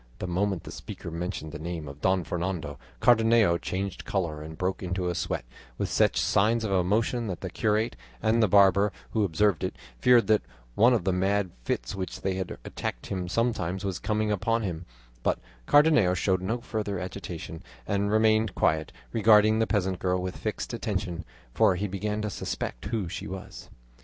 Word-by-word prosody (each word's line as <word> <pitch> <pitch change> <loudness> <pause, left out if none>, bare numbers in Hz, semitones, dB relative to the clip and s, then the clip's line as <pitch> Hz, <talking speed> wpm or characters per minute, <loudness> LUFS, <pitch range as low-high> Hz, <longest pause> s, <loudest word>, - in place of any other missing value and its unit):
The - - -4
moment 95 0 -1
the - - -8
speaker 85 - -8
mentioned 85 -2 -4
the 75 - -7
name 80 -1 -5
of 70 +2 -10
Don 95 -1 +2
Fernando, 85 -2 -3 0.2
Cardenio 115 -6 +4
changed 95 0 -3
colour 85 -6 -2
and 80 +1 -8
broke 95 0 -1
into 90 -1 -2
a - - -1
sweat, 75 - -2 0.3
with - - -2
such - - +3
signs 110 +3 +2
of 105 - -2
emotion 110 +6 +1
that 90 -4 -4
the - - -5
curate 110 +2 0 0.2
and 115 +1 +2
the 110 - +5
barber, 100 +1 +5 0.2
who 110 - +1
observed 100 -1 +2
it, - - -2 0.2
feared 125 -2 +5
that 110 -1 +3 0.3
one 120 - +5
of 115 - 0
the 95 - +1
mad 95 0 +1
fits - - -2
which 95 -2 -5
they 95 -1 -1
heard 95 -1 -4
attacked - - -5
him 90 -2 -3
sometimes 95 -4 -1
was 95 -3 -2
coming 105 0 0
upon 115 +3 +1
him; 85 -3 -4 0.3
but - - +1 0.3
Cardenio 145 - +5
showed 95 0 +1
no 110 +6 -2
further 105 -4 -3
agitation 85 -2 -6 0.3
and 100 0 0
remained 110 -1 +3
quiet, 80 0 +1 0.2
regarding 110 0 +5
the 115 - +2
peasant 95 -3 0
girl 90 0 +1
with 90 0 -4
fixed 110 +2 -4
attention, 95 -7 -3 0.3
for 95 - +4
he 100 +3 -2
began 105 +2 -2
to 105 - -1
suspect - - -4
who 105 -3 -2
she 85 - -5
was. 95 0 -8
95 Hz, 180 wpm, -27 LUFS, 90-110 Hz, 0.3 s, the